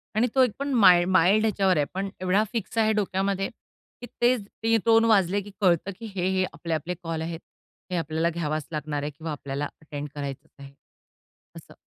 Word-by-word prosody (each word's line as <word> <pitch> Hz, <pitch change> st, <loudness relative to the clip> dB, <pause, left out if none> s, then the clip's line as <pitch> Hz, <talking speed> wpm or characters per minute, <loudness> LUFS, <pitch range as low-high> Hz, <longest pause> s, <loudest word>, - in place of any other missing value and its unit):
आणि 230 Hz, +3 st, +3 dB
तो 260 Hz, -, +6 dB
एक 250 Hz, -, +2 dB
पण 280 Hz, 0 st, -2 dB
माई 185 Hz, -7 st, +7 dB
माईल्ड 190 Hz, +4 st, +4 dB
ह्याच्यावर 195 Hz, -4 st, +2 dB
आहे 145 Hz, -, +2 dB
पण 195 Hz, +1 st, -2 dB
एवढा 185 Hz, +3 st, +2 dB
फिक्स 230 Hz, -1 st, -4 dB
आहे 220 Hz, -1 st, +4 dB
डोक्यामध्ये, 195 Hz, -1 st, -1 dB, 0.5 s
की -, -, -6 dB, 0.2 s
तेच 245 Hz, -1 st, +3 dB, 0.2 s
रिंगटोन 225 Hz, 0 st, +4 dB
वाजले, 200 Hz, -3 st, +3 dB
की 205 Hz, +1 st, -11 dB
कळतं 185 Hz, 0 st, +2 dB
की 230 Hz, -, -7 dB
हे, 180 Hz, -1 st, 0 dB
हे 190 Hz, 0 st, +1 dB
आपले 165 Hz, +3 st, -4 dB
आपले 160 Hz, +3 st, -2 dB
कॉल 165 Hz, -1 st, -3 dB
आहेत. 165 Hz, 0 st, -4 dB, 0.5 s
हे -, -, -1 dB
आपल्याला 160 Hz, +1 st, 0 dB
घ्यावाच 155 Hz, -2 st, -3 dB
लागणार 150 Hz, -1 st, -3 dB
आहे 150 Hz, -, -3 dB
किंवा 160 Hz, +2 st, -7 dB
आपल्याला 140 Hz, 0 st, -4 dB, 0.2 s
अटेंड 150 Hz, -1 st, -6 dB
करायचंच 140 Hz, -2 st, -6 dB
आहे. 140 Hz, 0 st, -11 dB, 0.8 s
असं. -, -, -12 dB
185 Hz, 185 wpm, -26 LUFS, 155-210 Hz, 0.8 s, माई